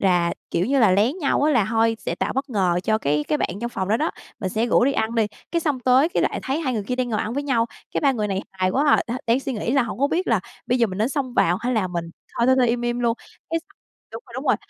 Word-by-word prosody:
rà, 175 -3 +3 0.2
kiểu 175 - 0
như 275 +2 +2
là, 220 -6 +5
lén 220 - +2
nhau 285 -2 +1
á, 305 0 +3
là 225 -7 +3
thôi 225 0 +2
sẽ - - -3
tạo - - -2
bất 270 +1 -3
ngờ 180 -5 +1
cho 220 +2 +1
cái 150 -1 0
cái 300 - +1
bạn - - 0
trong 240 0 -3
phòng 190 -4 -3
đó 220 - +3
đó, 310 +6 0 0.3
mình 190 - -2
sẽ 220 +4 0
rủ 240 - +4
đi 275 - +2
ăn 225 -1 -1
đi, 225 -2 +2 0.3
cái 335 - +1
xong 295 -6 -1
tới 260 +5 +4
cái 350 - 0
lại - - -1
thấy 275 +4 -1
hai 270 -6 -1
người 220 -4 -1
kia 250 - -1
đang 255 -1 -1
ngồi 215 -2 0
ăn 220 - -3
với 285 - -1
nhau, 240 -5 +1 0.3
cái - - +1
ba 275 -2 +3
người 210 -4 -2
này 195 0 -2
hài 185 -1 0
quá 275 +8 +1
à, - - 0
đ - - -4 0.2
đang 235 +3 +3
suy 270 - -3
nghĩ 225 +1 -2
là 275 -1 +4
hổng 235 0 -5
có 280 - +3
biết 360 +4 0
là 225 -6 +2 0.3
bây 250 +1 +1
giờ 230 - +4
mình 190 0 -6
nên 220 +4 +2
xông 270 -4 -3
vào 175 +2 +3
hay 250 +2 -1
là 215 -6 +1
mình 175 -1 -3 0.3
thôi 235 - +3
thôi 260 0 +5
thôi 245 -2 +4
im 240 +1 0
im 240 0 -1
luôn, 235 -1 +2 0.4
cái 330 - +1
x - - -27 0.5
đúng - - -7
rồi, - - -16
đúng - - -5
rồi, - - +4
235 Hz, 320 wpm, -23 LUFS, 210-270 Hz, 0.5 s, là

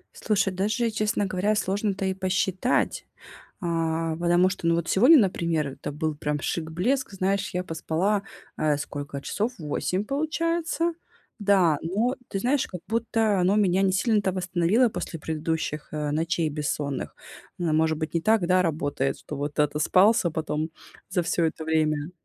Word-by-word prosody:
Слушай, 195 -3 0
даже, 215 +5 0
честно 215 -1 0
говоря, 195 +3 0
сложно-то 200 0 -1
и 190 - 0
посчитать, 190 +4 0 0.6
а. 165 -2 -1
Потому 175 +2 +3
что, 185 -2 -4
ну, 170 - +4
вот 170 -1 -2
сегодня, 260 +10 +7
например, 170 - +1
это 135 +2 -6
был 155 +1 -2
прям 150 0 -2
шик, 160 +1 -3
блеск. 245 +12 0
Знаешь, 195 +1 0
я 180 0 -2
поспала, 180 +5 0 0.3
э, 150 -1 +1
сколько 145 -1 -5
часов 215 - -2
8 175 +5 -2
получается. 330 +5 -1 0.5
Да, 185 -7 +4
но 215 +10 0
ты 195 - -3
знаешь, 255 +6 +1
как 180 - -8
будто 225 -2 +1
оно 190 +4 +3
меня 190 -2 +3
не 190 -1 +3
сильно-то 200 0 +2
восстановило 185 +6 +2
после 170 -6 -5
предыдущих, 160 -1 -3
э, 150 -1 -2
ночей 165 +2 0
бессонных. 145 -2 -3 0.4
Н 165 -3 +1
может 160 -1 +2
быть, 155 +1 -4
не 170 - +2
так, 220 -3 +3
да, 185 +1 +4
работает, 145 -4 -1
что 150 - -7
вот 145 +1 -4
отоспался 170 +7 +3
потом 155 0 -2 0.4
за 185 -2 +1
всё 170 0 0
это 160 0 -2
время. 155 -1 0
180 Hz, 155 wpm, -26 LUFS, 160-205 Hz, 0.6 s, сегодня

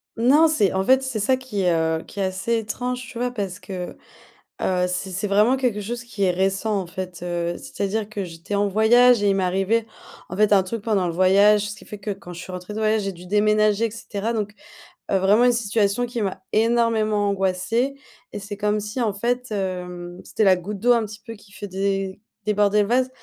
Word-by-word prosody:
Non, 275 +8 +5
c'est 215 - +2
en 190 0 +1
fait, 260 +4 +4
c'est 260 -4 -3
ça 255 +6 +2
qui 245 -7 -4
est, 180 -1 +3
heu, 160 0 0
qui 205 - -10
est 195 - +1
assez 190 +5 -1
étrange, 250 +3 -3
tu 235 - -8
vois? 245 0 0
Parce 200 -6 -4
que, 180 -2 -6 0.7
heu, 180 -1 +1
c 180 +1 -3
c'est 195 +3 -2
vraiment 210 +6 +3
quelque 230 -6 0
chose 235 +3 -4
qui 230 -4 -6
est 185 - +4
récent, 195 +3 0
en 180 - -5
fait, 180 0 -7
heu, 175 -1 -2
c'est-à-dire 205 +1 -3
que 205 -3 -4
j'étais 170 +3 -7
en 205 0 +2
voyage 225 +3 +5
et 205 - +3
il 195 - +3
m'est 190 - +1
arrivait 195 +5 +1 0.4
en 185 - -5
fait 210 -1 +4
un 190 - +5
truc 210 +3 -5
pendant 205 -5 +1
le - - -2
voyage. 200 +3 +4
Ce 210 - -7
qui - - -14
fait 210 - -9
que 205 +1 -5
quand 185 -2 -10
je 170 - -8
suis 185 - -9
rentrée 180 +3 -7
de 210 - -5
voyage, 215 -1 +2
j'ai 195 0 -3
dû 180 +1 -12
déménager 215 +2 +3
et - - -5
cetera 220 0 -4
donc, 210 -2 -2 0.6
heu, 195 - +3
vraiment 205 +6 +4
une 245 - +5
situation 220 0 +1
qui 240 -1 -4
m'a 190 -1 -3
énormément 220 -2 +2
angoissée 195 +7 0 0.4
et - - -4
c'est 205 0 -7
comme 210 0 0
si 210 +5 -5
en 220 -4 +1
fait, 245 +3 -2
hem, 180 -2 -4
c'était 220 - -1
la 190 -2 +5
goutte 195 +3 -6
d'eau, 245 +3 +3
un 235 -2 +3
petit 210 +1 -10
peu, 230 - -7
qui 205 -1 -19
fait 205 0 -7
dé 195 0 -2 0.2
déborder 210 0 +3
le 200 - 0
vase. 255 +2 +2
205 Hz, 230 wpm, -23 LUFS, 190-225 Hz, 0.7 s, Non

